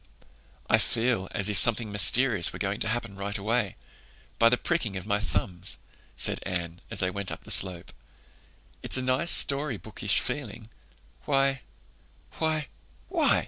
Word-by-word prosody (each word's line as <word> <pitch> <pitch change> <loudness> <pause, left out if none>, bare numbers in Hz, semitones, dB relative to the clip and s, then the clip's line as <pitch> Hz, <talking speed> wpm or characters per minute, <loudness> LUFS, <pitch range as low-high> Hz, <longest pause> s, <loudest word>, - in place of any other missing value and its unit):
"I - - +3
feel 115 -5 -1
as 100 - +1
if 105 -3 -1
something 115 0 +2
mysterious 105 -1 +6
were - - -9
going 100 +1 -3
to - - -1
happen 120 -3 -4
right 100 +2 -4
away—'by 115 +1 -3
the 125 - +1
pricking 120 - -3
of 95 - -8
my 100 -1 -1
thumbs,'" 95 -3 -2 0.4
said - - 0
Anne, 85 -1 -6
as - - -2
they 90 0 -1
went 100 0 -3
up - - -8
the - - -9
slope. 90 -3 -1 0.9
"It's - - +3
a 130 - -3
nice 130 +7 +1
story 140 -2 +5
bookish 105 -1 -1
feeling. 115 -6 -5 0.6
Why—why—why! 135 - -4
105 Hz, 145 wpm, -26 LUFS, 95-130 Hz, 0.9 s, mysterious